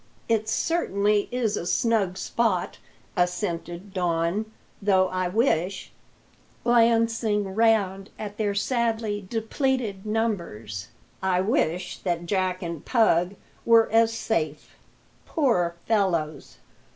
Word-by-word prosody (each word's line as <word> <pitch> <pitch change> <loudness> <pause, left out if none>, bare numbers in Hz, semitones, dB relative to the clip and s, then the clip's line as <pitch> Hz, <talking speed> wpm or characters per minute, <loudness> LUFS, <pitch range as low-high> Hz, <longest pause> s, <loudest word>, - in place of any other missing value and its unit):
"It 220 -1 +1
certainly 210 - +1
is 235 -4 0
a 175 - -4
snug 200 -2 +1
spot," 195 -6 -1 0.4
assented 180 0 -2
Don; 175 +3 0 0.3
"though 190 -2 +3
I 185 0 -1
wish" 190 -3 0 0.7
glancing 230 -4 +2
round 200 -3 +2
at 205 -1 -6
their 205 -2 0
sadly 220 -2 0
depleted 225 -3 -1
numbers 170 - -3 0.3
"I 185 -1 +2
wish 185 - 0
that 175 -2 -2
Jack 185 0 -1
and 170 -3 -5
Pug 195 -6 +2 0.3
were 230 -1 +5
as 225 0 +4
safe, 155 -10 -2 0.5
poor 180 - +1
fellows." 170 -9 0
200 Hz, 105 wpm, -25 LUFS, 180-225 Hz, 0.7 s, were